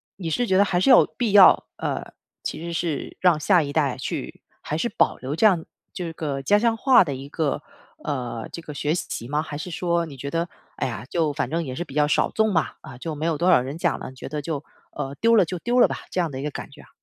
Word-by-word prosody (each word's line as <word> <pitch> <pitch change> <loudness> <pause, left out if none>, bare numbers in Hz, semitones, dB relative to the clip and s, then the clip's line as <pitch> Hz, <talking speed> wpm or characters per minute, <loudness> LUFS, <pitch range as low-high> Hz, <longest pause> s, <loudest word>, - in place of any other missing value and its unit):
你 170 -4 -5
是 240 +9 0
觉 190 - +3
得 200 - +6
还 180 -3 0
是 270 - +2
有 255 - +8
必 230 -5 0
要， 195 -2 +8
呃， - - -4 0.3
其 - - -4
实 170 - -4
是 165 -3 -3
让 180 -4 +4
下 175 +3 +4
一 145 -1 -4
代 140 -5 +1
去 - - -5 0.2
还 - - -3
是 - - 0
保 - - +1
留 135 +4 -4
这 195 - +2
样 180 -6 +4 0.3
这 170 -3 -5
个 145 -4 -3
家 205 +10 +4
乡 230 0 +2
话 260 -6 +6
的 145 -5 -4
一 135 +2 -7
个， 150 -1 -1 0.4
呃， 125 -6 -3
这 170 - -6
个 150 -2 -8
学 150 +2 -1
习 120 -8 -4
吗？ 150 +2 0
还 145 -2 -6
是 170 +4 -6
说 170 0 0
你 145 -4 -10
觉 140 +2 -6
得， 170 +1 -1 0.3
哎 - - -1
呀， 115 -1 -6
就 160 -4 0
反 145 - -2
正 165 +2 -1
也 130 -1 -5
是 175 - -3
比 135 - -13
较 150 0 +3
少 - - +2
众 220 -2 +1
吧， 165 - 0
啊， 130 -5 -11
就 155 +3 -5
没 155 +2 -3
有 165 -3 +1
多 180 +3 +2
少 150 - +6
人 135 +5 -5
讲 170 -3 0
了， - - -7
你 130 - -14
觉 130 - -8
得 150 0 -3
就， 150 -1 -4 0.3
呃， 135 +1 -5
丢 230 0 +5
了 195 -5 +5
就 180 +2 -4
丢 245 +5 +1
了 - - +7
吧， - - -4
这 185 - -1
样 165 - -1
的 130 - -5
一 - - -5
个 150 - -2
感 - - -7
觉 - - -14
啊？ - - -19
160 Hz, 295 characters per minute, -24 LUFS, 140-180 Hz, 0.4 s, 有